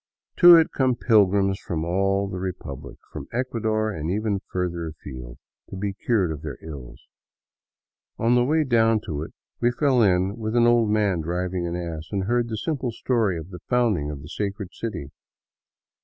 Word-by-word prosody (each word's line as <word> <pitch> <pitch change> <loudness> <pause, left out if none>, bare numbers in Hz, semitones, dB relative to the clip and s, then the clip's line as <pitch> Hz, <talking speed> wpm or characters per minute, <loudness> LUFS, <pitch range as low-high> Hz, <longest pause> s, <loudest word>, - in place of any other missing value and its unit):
To 175 -1 +10
it 165 -1 +4
come 130 -2 +2
pilgrims 100 -4 +3
from 80 -2 -3
all 100 +3 +1
the 95 -1 -5
Republic, 95 -1 -6 0.2
from - - -7
Ecuador 110 -3 -1
and 80 -4 -4
even 100 0 -1
further 85 -2 -2
afield, 65 -6 -9 0.3
to - - -7
be 100 +1 -3
cured 95 -4 0
of 75 -1 -6
their 75 -5 -6
ills. 70 -6 -10 1.1
On 115 +1 +2
the 125 0 +4
way 155 +5 +2
down 115 -4 +3
to 75 -8 -5
it 80 - -6 0.3
we 120 - +3
fell 130 0 +2
in 95 -1 +2
with 110 0 -3
an 120 -1 +5
old 120 -2 +4
man 105 -5 +1
driving 90 +2 -2
an 85 - -3
ass, 85 -2 -5
and 100 -2 -1
heard 120 +3 0
the 110 - -3
simple 130 0 -2
story 110 -6 0
of 80 +3 -8
the 90 - -8
founding 115 - +1
of 70 -1 -7
the 75 - -10
sacred 100 0 -4
city. 85 -12 -5
100 Hz, 180 wpm, -24 LUFS, 85-115 Hz, 1.1 s, To